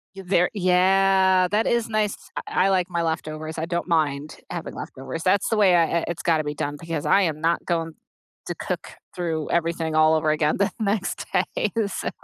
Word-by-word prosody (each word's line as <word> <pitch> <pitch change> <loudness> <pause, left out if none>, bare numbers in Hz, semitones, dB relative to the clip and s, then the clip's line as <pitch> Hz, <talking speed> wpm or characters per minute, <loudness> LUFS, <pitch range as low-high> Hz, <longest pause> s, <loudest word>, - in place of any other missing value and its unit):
Y 195 - -8
there 180 -1 +3
yeah. 190 0 +4
That 210 +2 +1
is 235 -1 +1
nice. 215 -2 0 0.3
I 185 - +1
l - - +2
like 185 -1 +1
my 170 -1 -1
leftovers. 155 -1 -3
I 160 - -2
don't 175 +1 -3
mind 150 -3 0
having - - -6
leftovers. 135 +5 -7
That's 190 +1 +2
the 225 - +1
way 190 -4 +5
I 170 -1 +5
i - - -4
it's 170 -1 -4
gotta 160 -2 +2
be 150 0 -3
done 145 0 -3
because 165 -3 -4
I 200 - +4
am 155 -3 -1
not 165 +1 +2
going 165 -2 -1 0.5
to - - -3
cook - - -4 0.3
through 165 -3 -2
everything 165 -1 0
all 155 0 +5
over 155 0 +2
again 155 0 +1
the 200 +1 +1
next 200 -2 -1
day, - - 0 0.2
so - - -3
170 Hz, 200 wpm, -24 LUFS, 160-190 Hz, 0.5 s, way